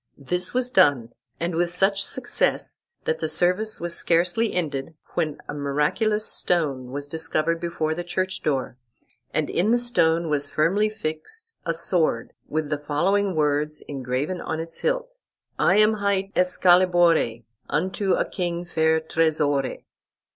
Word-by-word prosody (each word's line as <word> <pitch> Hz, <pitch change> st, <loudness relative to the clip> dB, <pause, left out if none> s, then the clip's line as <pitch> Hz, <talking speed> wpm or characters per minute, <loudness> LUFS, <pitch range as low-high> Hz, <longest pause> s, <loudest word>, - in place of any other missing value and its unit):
This 180 Hz, +6 st, 0 dB
was 250 Hz, 0 st, +1 dB
done, 140 Hz, -, +3 dB, 0.3 s
and 170 Hz, +1 st, -2 dB
with 170 Hz, +1 st, +1 dB
such 195 Hz, +3 st, +2 dB
success, 245 Hz, +4 st, -1 dB, 0.2 s
that 160 Hz, -, -1 dB
the 160 Hz, -, -2 dB
service 180 Hz, +7 st, +1 dB
was 170 Hz, 0 st, -1 dB
scarcely 175 Hz, +8 st, +2 dB
ended 155 Hz, -3 st, -3 dB, 0.2 s
when 155 Hz, -4 st, -1 dB
a -, -, -5 dB
miraculous 150 Hz, +10 st, 0 dB
stone 140 Hz, -8 st, 0 dB
was 140 Hz, +2 st, -5 dB
discovered 160 Hz, +1 st, -1 dB
before 165 Hz, -2 st, -2 dB
the 175 Hz, +2 st, -4 dB
church 185 Hz, +2 st, -2 dB
door, 135 Hz, -4 st, -1 dB, 0.5 s
and -, -, 0 dB
in 185 Hz, +5 st, 0 dB
the 240 Hz, -, +4 dB
stone 170 Hz, -9 st, +2 dB
was 145 Hz, -2 st, 0 dB
firmly 195 Hz, +8 st, +2 dB
fixed 215 Hz, -, -6 dB
a 165 Hz, -, +1 dB
sword, 165 Hz, -7 st, 0 dB
with 155 Hz, -1 st, -2 dB
the 150 Hz, -, 0 dB
following 185 Hz, +7 st, 0 dB
words 150 Hz, 0 st, 0 dB
engraven 135 Hz, +6 st, -3 dB
on 160 Hz, -, -3 dB
its 165 Hz, 0 st, -7 dB
hilt: -, -, 0 dB, 0.5 s
"I 190 Hz, -, +4 dB
am 215 Hz, +1 st, +5 dB
hight 200 Hz, -2 st, -1 dB
Escalibore, 175 Hz, -8 st, +3 dB, 0.3 s
Unto 190 Hz, +2 st, 0 dB
a -, -, +1 dB
king 175 Hz, -1 st, -3 dB
fair 160 Hz, -1 st, +2 dB
tresore." 150 Hz, -4 st, 0 dB
170 Hz, 145 wpm, -24 LUFS, 150-190 Hz, 0.5 s, am